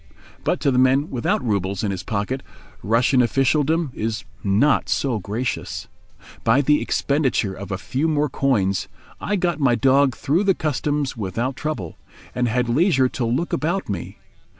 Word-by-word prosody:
But - - 0
to 140 - +2
the 125 - +2
man 130 +4 +3
without 125 0 -1
roubles 100 -2 -1
in 105 - 0
his 95 -2 -4
pocket, 110 +5 -2 0.4
Russian 120 +4 +3
officialdom 140 +6 +1
is 110 +1 -3 0.2
not 105 +9 +2
so 125 -6 0
gracious. 110 +6 -4 0.6
By 115 +5 +4
the 150 +1 +3
expenditure 135 -8 0
of 100 +2 -8
a 95 - -1
few 130 - -1
more 150 -1 +1
coins 105 -9 0 0.3
I 205 - -1
got 175 -4 0
my 130 -4 +3
dog 135 0 +3
through 155 +8 0
the 195 -2 +3
Customs 145 -2 -1
without 115 +5 -3
trouble, 120 - -5 0.3
and 125 -1 0
had 120 +1 0
leisure 135 0 +3
to 125 - -3
look 125 +9 -1
about 175 - -1
me. 95 -4 -5
130 Hz, 160 wpm, -22 LUFS, 110-145 Hz, 0.6 s, By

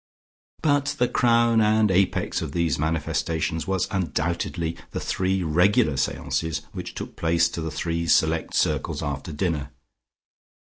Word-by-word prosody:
But 145 -1 +2
the 125 - +3
crown 115 -2 +3
and 110 -1 +3
apex 95 +1 +1
of - - -5
these 85 -4 0
manifestations 80 +1 -1
was 95 -1 0
undoubtedly 85 -2 -2
the - - -4
three 95 0 -1
regular 90 - +3
seances 80 +4 -2
which - - -6
took - - -7
place 85 0 +2
to 85 - -5
the 80 - -3
three 85 +1 -2
select 80 0 +2
circles - - 0
after 70 +3 -4
dinner. 75 -3 -2
85 Hz, 135 wpm, -24 LUFS, 80-100 Hz, -, the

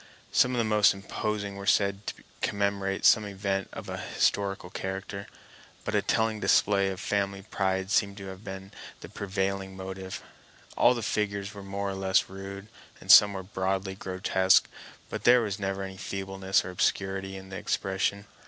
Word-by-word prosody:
Some 125 - +4
of - - -1
the 115 - +2
most 105 -2 +4
imposing 100 0 -3
were 100 0 -7
said 100 0 +2
to - - -6 0.2
commemorate 100 -1 -1
some 110 - +7
event 100 -1 -2
of - - -8
an - - -5 0.2
historical 100 -2 +1
character. 95 +1 -5 0.6
But - - -2
a - - +3
telling 110 -1 +1
display 100 -2 +3
of 95 -1 -5
family 100 -1 -1
pride 95 -1 -1
seemed 100 -2 +2
to 95 - -8
have 95 +2 -10
been 95 -1 -8 0.3
the - - -9
prevailing 95 -1 -3
motive. 95 0 -6 0.5
All 125 - +5
the 120 - -4
figures 100 -1 -1
were 100 - -9
more 100 0 -3
or - - -5
less 95 +1 +2
rude, 95 +1 -8 0.3
and - - +2
some 105 -1 +9
were 95 -1 -5
broadly 95 0 -2
grotesque, 95 0 +2 0.4
but - - -4
there 125 0 +7
was 105 -2 -3
never 95 0 -2
any 95 0 -7
feebleness 95 0 -1
or 90 - -5
obscurity 95 +1 -1
in 95 0 -11
the 95 - -6
expression. 95 +2 -1
95 Hz, 170 wpm, -28 LUFS, 95-100 Hz, 0.6 s, some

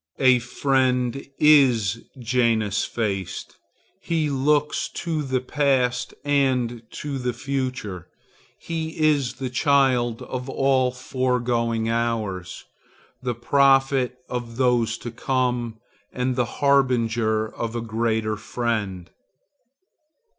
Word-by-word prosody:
A 130 -2 +5
friend 125 0 0
is 125 -8 +4
Janus 115 -4 +1
faced; 100 -5 -4 0.4
he 160 -3 0
looks 145 +2 +1
to 165 -3 -2
the 130 -3 -1
past 125 -3 0
and 130 -5 +1 0.2
the 135 -4 -2
future. 130 -8 -4 0.5
He 160 -1 -5
is 150 -5 +2
the 130 -1 -5
child 130 -4 +2
of 125 +1 -5
all 135 -1 +2
my 125 - -10
foregoing 120 -3 0
hours, 110 -6 -2 0.6
the 125 -2 -2
prophet 135 0 +3
of 120 -2 -5
those 120 -3 +2
to 120 - -7
come, 125 -2 -1 0.3
and 125 0 -1
the 125 -1 +1
harbinger 115 -5 +1
of 115 0 -4
a 120 - -2
greater 110 -1 -1
friend. 105 -6 -3
125 Hz, 105 wpm, -23 LUFS, 115-135 Hz, 0.6 s, A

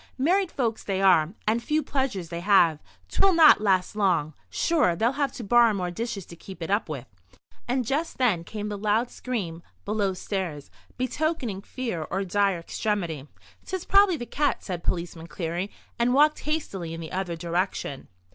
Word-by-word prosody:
Married 355 +7 +2
folks 230 -4 -1
they 195 -1 -1
are; 180 -2 +4
and 225 +2 +1
few 305 +5 0
pleasures 260 - -2
they 170 0 -4
have. 175 -5 +4 0.3
'Twill 390 -1 +3
not 320 -8 +7
last 190 -2 +2
long. 175 -7 +1 0.2
Sure, 305 - +2
they'll 225 +6 +2
have 275 -1 -1
to 240 - -7
borrow 230 +1 +5
more 180 -2 -2
dishes 205 -1 -4
to 170 - -11
keep 185 +1 -9
it 165 - -4
up 205 -3 +1
with." 140 -6 -5 0.6
And 250 0 0
just 295 +7 -1
then 215 -10 +2
came 210 +3 -5
the 205 -1 -4
loud 215 +4 +1
scream 185 -10 -4 0.2
below 205 -2 0
stairs, 180 -7 -4 0.3
betokening 255 - -1
fear 230 -6 -4
or 195 +2 -1
dire 195 0 +1
extremity. 170 -5 -3 0.4
"'Tis 375 -2 -4
probably 395 -3 +5
the 240 - -5
cat," 290 +3 0
said 180 -3 -5
Policeman 170 -1 -3
Cleary, 175 +3 -3 0.3
and 245 +2 +3
walked 300 +2 +5
hastily 195 - -3
in - - -7
the 160 -1 -7
other 185 -2 -2
direction. 170 -4 -2
205 Hz, 175 wpm, -26 LUFS, 175-255 Hz, 0.6 s, not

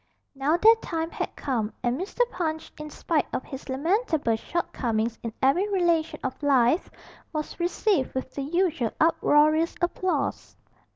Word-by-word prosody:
Now 280 +4 +1
their 440 +5 +7
time 325 -6 -3
had - - -4
come, 230 -6 -2
and 245 0 +1
Mr. 380 - -3
Punch, 315 -2 -3
in 300 0 -6
spite 310 +1 -1
of - - -2
his 270 +1 -9
lamentable 315 - +1
shortcomings 230 -5 -2
in 230 - -4
every 345 +10 +3
relation 340 -4 +1
of 260 +2 -4
life, 275 +2 +3 0.4
was 305 +2 -5
received 345 -4 0
with 260 0 -4
the 280 - -4
usual 315 - 0
uproarious 310 0 +3
applause. 350 -4 -2
305 Hz, 140 wpm, -26 LUFS, 260-345 Hz, 0.4 s, their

